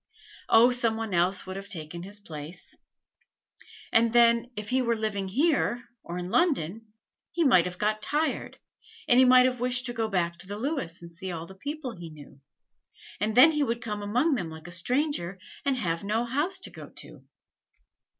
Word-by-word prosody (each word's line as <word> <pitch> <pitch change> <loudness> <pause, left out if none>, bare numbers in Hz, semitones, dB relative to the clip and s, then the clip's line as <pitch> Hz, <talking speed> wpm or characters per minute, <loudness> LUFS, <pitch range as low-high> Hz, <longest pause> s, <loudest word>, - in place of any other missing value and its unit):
"Oh, 235 +3 +7
some 235 -3 +1
one 225 -3 -4
else 180 +2 +2
would 190 0 -6
have 195 +1 -8
taken 165 -1 -7
his 200 +3 -9
place." 155 -2 -9 1.2
"And 230 0 +4
then, 235 0 +4
if 210 0 -6
he 260 +1 +2
were 235 -2 +1
living 210 -3 -2
here, 250 - +1 0.2
or 175 - -6
in 180 +1 -5
London, 225 - +1 0.4
he 340 - +1
might 185 - +5
have 180 0 -5
got 215 +2 0
tired, 295 +6 -1 0.5
and 245 - +5
he 260 - +7
might 255 0 +7
have 255 -1 0
wished 250 +1 0
to 240 - -1
go 225 -2 -1
back 175 -4 -1
to 185 - -10
the 205 +1 -5
Lewis 215 - -3
and 170 0 -11
see 185 +2 -5
all 165 -1 -5
the 190 - -12
people 285 +5 -5
he 175 -6 -9
knew; 145 -3 -14 0.8
and 215 +2 -1
then 275 +6 +8
he 300 -1 0
would 235 -4 0
come 210 -3 -4
among 245 +10 +1
them 185 -11 -2
like 160 0 -11
a 175 - -8
stranger, 200 - -1 0.3
and 275 -2 +1
have 170 -6 -2
no 220 +4 0
house 295 +10 0
to - - -8
go - - -10
to." - - -10
220 Hz, 195 wpm, -27 LUFS, 180-250 Hz, 1.2 s, then